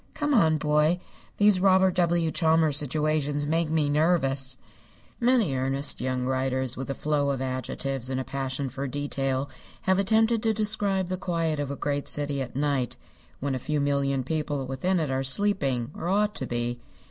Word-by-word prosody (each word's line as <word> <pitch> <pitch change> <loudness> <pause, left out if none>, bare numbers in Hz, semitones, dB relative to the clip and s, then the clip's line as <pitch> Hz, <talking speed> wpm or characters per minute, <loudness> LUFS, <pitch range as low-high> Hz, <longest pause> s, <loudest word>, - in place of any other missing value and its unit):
Come 295 -1 0
on, 160 - +4
boy. 150 +3 +2 0.4
These 205 -2 +5
Robert 190 -1 +4
W. 170 -2 +1
Chambers 160 -3 +2
situations 150 0 0
make 160 +1 0
me 155 -2 +1
nervous." 140 -4 +1 0.6
Many 235 - +2
earnest 135 +2 +3
young 130 0 -1
writers 130 -1 -1
with 135 +1 -6
a 135 - -2
flow 145 -2 0
of 135 -2 -1
adjectives 130 0 -3
and 130 0 -2
a - - -2
passion 135 +1 -3
for 135 +2 -4
detail 135 -1 -2 0.3
have 190 0 +2
attempted 220 +3 +2
to 220 -1 +1
describe 205 -3 0
the 185 - -2
quiet 165 -4 -1
of 145 -2 -2
a 140 - -3
great 145 0 -2
city 145 -1 +1
at 130 -1 -6
night, 140 -3 -1 0.4
when 140 0 -2
a 130 - -2
few 150 +4 -2
million 140 -1 0
people 145 -1 -2
within 150 +8 -1
it 155 -4 -1
are 130 0 0
sleeping, 135 - 0
or 170 - -4
ought 210 +2 +2
to 130 - -3
be. 120 0 -3
145 Hz, 175 wpm, -26 LUFS, 135-175 Hz, 0.6 s, These